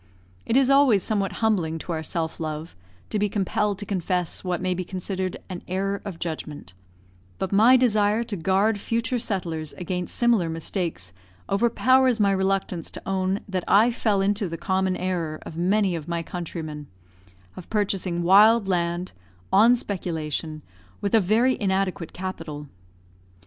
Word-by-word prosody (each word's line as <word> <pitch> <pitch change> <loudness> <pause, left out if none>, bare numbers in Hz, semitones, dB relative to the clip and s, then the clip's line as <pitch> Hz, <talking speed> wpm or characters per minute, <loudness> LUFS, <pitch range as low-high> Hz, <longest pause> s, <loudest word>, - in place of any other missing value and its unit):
It 235 - +3
is 270 0 +4
always 270 -9 +5
somewhat 200 -3 0
humbling 170 -7 +1
to 170 - -7
our 160 -1 -2
self 160 0 -3
love 155 0 -5 0.4
to 210 - 0
be 205 0 +1
compelled 205 +1 0
to 205 - -7
confess 180 -3 -2
what 180 -2 -1
may 185 0 0
be 185 +1 -3
considered 185 0 -4
an 185 -2 -6
error 195 +2 -2
of 195 -5 -6
judgment, 155 - -6 0.6
but 190 - -3
my 225 +6 +6
desire 215 -2 +2
to 225 -3 -5
guard 195 +5 +1
future 230 +3 -1
settlers 165 -8 -3
against 180 -1 -4
similar 230 -8 +2
mistakes 160 - -4 0.4
overpowers 240 +3 +3
my 200 -1 +4
reluctance 190 -3 -1
to - - -11
own 190 +1 0
that 185 -3 -2
I 220 +5 +5
fell 215 -4 +1
into 200 -1 0
the 165 - -5
common 190 +1 0
error 175 -4 -2
of - - -9
many 190 +2 +1
of 160 -2 -6
my 170 -1 -2
countrymen, 155 -4 -6 0.7
of 180 - -10
purchasing 190 -5 -1
wild 205 +4 +6
land, 175 -1 -1 0.4
on 225 +5 +7
speculation, 160 - -4 0.4
with 200 - -2
a 225 - +7
very 225 +7 +3
inadequate 190 -3 -1
capital. 165 -5 -6
190 Hz, 155 wpm, -24 LUFS, 170-210 Hz, 0.7 s, on